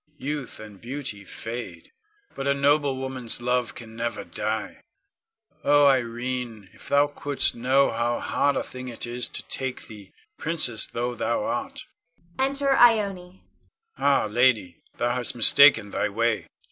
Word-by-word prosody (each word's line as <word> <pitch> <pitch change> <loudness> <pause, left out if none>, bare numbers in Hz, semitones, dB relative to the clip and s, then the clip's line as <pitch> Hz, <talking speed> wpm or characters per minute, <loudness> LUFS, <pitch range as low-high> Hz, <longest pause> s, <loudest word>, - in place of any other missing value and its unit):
Youth 145 -2 -5
and 105 -3 -12
beauty 125 -5 -6
fade, 115 +5 -7 0.4
but 135 - -4
a 140 - +3
noble 140 -1 +2
woman's 130 -3 -2
love 125 0 -1
can 115 -2 -11
never 115 -3 -3
die. 110 0 -4 0.8
Oh, 145 0 +5
Irene, 120 -5 -1
if - - -12
thou 145 +1 +5
couldst 145 -1 -2
know 130 +3 +2
how 120 0 -1
hard 145 -1 0
a - - -1
thing 130 0 -9
it 120 -1 -5
is 120 +1 -3
to - - -8
take 130 -1 -3
thee, 105 -3 -13 0.3
princess 155 -9 0
though 120 +1 -3
thou 270 - -1
art! 275 -1 -4 0.5
[Enter 275 +1 +2
Ione.] 200 -7 +3 0.5
Ah, 140 -4 +2
lady, 110 -6 +1 0.2
thou 120 0 0
hast 125 -1 -1
mistaken 115 -3 +6
thy 105 - -1
way! 115 +2 0
125 Hz, 145 wpm, -25 LUFS, 115-145 Hz, 0.8 s, mistaken